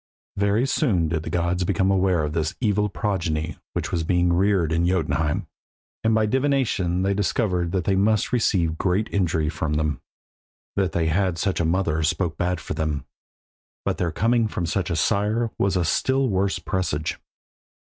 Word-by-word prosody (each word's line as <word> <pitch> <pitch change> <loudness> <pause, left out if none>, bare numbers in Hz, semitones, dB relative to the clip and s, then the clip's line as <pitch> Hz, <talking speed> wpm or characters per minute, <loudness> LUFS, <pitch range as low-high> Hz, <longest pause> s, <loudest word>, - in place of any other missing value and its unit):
Very 100 +5 +2
soon 105 - +1
did 80 -1 -1
the - - -6
gods 90 +1 0
become 95 +2 +1
aware 95 -4 +2
of 75 0 -2
this 80 -1 -1
evil 105 -3 +1
progeny 85 -6 -2
which - - -3
was 85 -2 0
being 90 +1 +2
reared 95 -3 +2
in 85 +2 +2
Jotunheim, 80 -4 0 0.6
and 110 0 +3
by 110 -1 +3
divination 120 -8 +1
they 100 +1 +1
discovered 90 -3 0
that 95 -2 0
they 95 - +1
must 105 +4 +2
receive 85 -9 +1
great 95 +3 +1
injury 80 -5 +1
from 75 -1 -2
them. 75 -1 -1 0.7
That 95 -2 0
they 85 - +1
had 90 +2 +1
such 95 +1 -1
a 85 - +1
mother 80 -2 +1
spoke 80 +1 0
bad 90 0 -1
for - - -5
them, 75 -4 -2 0.8
but - - -1
their 85 - 0
coming 115 +5 +2
of 85 - 0
such 95 +2 -1
a 85 - 0
sire 105 +8 +1
was 100 -1 +2
a 90 -2 +1
still 130 +9 +1
worse 95 0 +1
presage. 80 -5 -2
90 Hz, 175 wpm, -24 LUFS, 80-100 Hz, 0.8 s, and